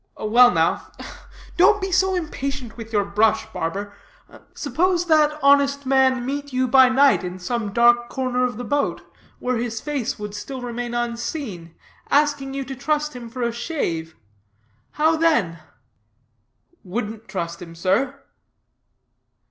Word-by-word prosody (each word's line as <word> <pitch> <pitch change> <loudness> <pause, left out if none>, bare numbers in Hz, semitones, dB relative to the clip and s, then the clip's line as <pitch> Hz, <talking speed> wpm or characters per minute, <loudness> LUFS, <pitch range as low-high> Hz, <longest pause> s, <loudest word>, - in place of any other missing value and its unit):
"Well 240 +3 +5
now - - 0 0.7
don't 410 +4 +5
be 385 -1 -3
so 380 +1 +2
impatient 275 -8 -4
with 225 -1 -9
your 205 -2 +1
brush, 210 +2 +2
barber 200 +5 -4 0.6
suppose 355 0 0
that 305 -2 +3
honest 280 0 +4
man 260 -2 +3
meet 285 +1 -4
you 255 0 +1
by 260 +1 +6
night 270 -3 +4
in 180 0 -5
some 210 +3 -3
dark 240 +2 +4
corner 255 -1 -1
of 245 -3 -1
the 245 - -5
boat 285 +5 -1 0.3
where 250 -1 -1
his 230 -1 -3
face 275 -3 -3
would 210 -1 -6
still 260 +6 -6
remain 240 0 -4
unseen, 235 - -4 0.3
asking 285 -2 +1
you 275 - -2
to 270 - -6
trust 300 +1 -1
him 240 -2 -8
for 250 +1 -5
a 235 - 0
shave 175 - -3 0.8
how 315 +2 +2
then?" 310 - +1 1.2
"Wouldn't 215 +3 -5
trust 170 -3 -5
him, 165 -1 -10
sir." 225 +11 0
250 Hz, 140 wpm, -22 LUFS, 215-280 Hz, 1.2 s, by